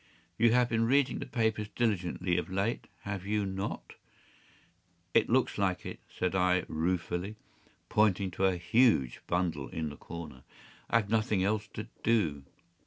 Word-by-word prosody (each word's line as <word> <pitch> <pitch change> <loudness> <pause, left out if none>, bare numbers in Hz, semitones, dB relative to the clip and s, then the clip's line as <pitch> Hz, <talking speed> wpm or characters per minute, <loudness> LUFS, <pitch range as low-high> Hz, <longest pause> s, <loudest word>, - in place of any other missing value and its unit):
You 115 0 +4
have 125 -1 +4
been 115 -1 +1
reading 140 +2 +3
the - - -5
papers 110 -3 0
diligently 90 -6 0
of 90 - -5
late, 100 +5 -1
have 100 -2 -4
you 105 +1 0
not?” 95 0 -4 1.2
“It - - +4
looks - - +2
like 95 -2 0
it,” - - -6
said 90 - -2
I, 90 -1 +3
ruefully, 90 +4 -1 0.5
pointing 100 -3 +2
to 95 +3 0
a 95 -2 +2
huge 95 - +3
bundle 85 -6 0
in 80 -4 -3
the 75 - -10
corner. 80 -5 -8 0.5
“I - - 0
have 115 - +5
had 100 - -11
nothing 110 -3 +2
else 105 +1 0
to 110 +1 -5
do. 80 -12 +1
95 Hz, 160 wpm, -31 LUFS, 90-110 Hz, 1.2 s, have